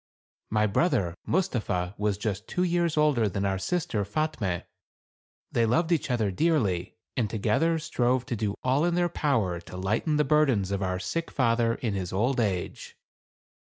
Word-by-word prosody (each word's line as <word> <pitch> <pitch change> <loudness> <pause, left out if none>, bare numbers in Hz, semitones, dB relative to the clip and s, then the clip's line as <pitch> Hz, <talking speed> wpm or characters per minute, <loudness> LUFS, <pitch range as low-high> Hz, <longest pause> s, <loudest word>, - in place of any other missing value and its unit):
My 105 0 +2
brother 105 - +1
Mustapha 110 - 0
was 105 -1 0
just 105 0 -3
two 180 - 0
years 170 -2 +1
older 140 -8 +3
than 100 +1 -2
our 95 -1 0
sister 160 - -1
Fatme. 105 - -2 0.9
They 115 -1 +2
loved 160 +9 +1
each 155 -3 +1
other 110 -5 +1
dearly, 105 - 0 0.2
and 115 -5 0
together 115 +10 +1
strove 130 -5 0
to 120 - -3
do 105 -2 -2
all 130 +4 +2
in 175 0 +2
their 175 0 +2
power 115 - 0
to 90 - -10
lighten 110 - 0
the 150 - +4
burdens 135 -10 +2
of 100 0 -1
our 90 -1 -1
sick 165 - -3
father 115 -2 +2
in 115 -5 -2
his 95 -2 -3
old 120 +7 +1
age. 95 -6 -2
115 Hz, 165 wpm, -27 LUFS, 100-150 Hz, 0.9 s, the